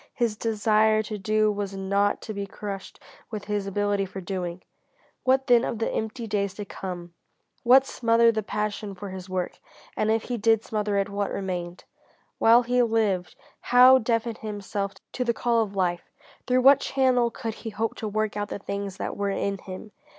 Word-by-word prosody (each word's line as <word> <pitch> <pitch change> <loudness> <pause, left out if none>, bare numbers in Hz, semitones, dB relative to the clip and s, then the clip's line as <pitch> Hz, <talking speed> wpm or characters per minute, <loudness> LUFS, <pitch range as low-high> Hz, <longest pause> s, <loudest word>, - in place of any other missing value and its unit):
His 235 -3 0
desire 215 0 +2
to 210 -1 -5
do 215 +2 +2
was 200 -1 -4
not 200 +1 +1
to 215 - -5
be 200 -1 -4
crushed 195 0 -7 0.3
with 215 -3 -6
his 205 -1 -2
ability 205 0 0
for 190 - -7
doing. 180 -1 -4 0.6
What 265 +1 +3
then 245 -2 +5
of 235 - -2
the 225 - -1
empty 220 +2 -3
days 200 -3 -1
to 205 - -6
come? 175 -3 -7 0.6
How 260 +2 +9
smother 230 -3 +3
the 220 -1 -1
passion 210 -1 -3
for 200 +2 -7
his 185 0 -8
work? 185 -1 -3 0.4
And 215 - 0
if 225 0 +2
he 245 - -3
did 225 +1 +3
smother 210 -2 -1
it, 195 - +1
what 200 0 -2
remained? 180 -2 -4 0.6
While 235 +2 +6
he 245 +1 +2
lived, 215 -7 0 0.3
how 255 +1 +7
deafen 230 -1 -1
himself 205 -2 -4 0.2
to 250 - -2
the 235 -2 0
call 235 -1 +2
of 205 -2 -3
life? 175 -2 -1 0.4
Through 255 0 +3
what 275 +2 +7
channel 255 -3 +2
could 225 -1 -5
he 225 - -4
hope 220 +1 -2
to 220 - -4
work 215 0 -1
out 205 -1 -3
the - - -4
things 200 -1 -5
that - - -4
were 200 0 -1
in 200 0 -2
him? 190 +3 -9
210 Hz, 185 wpm, -26 LUFS, 200-230 Hz, 0.6 s, How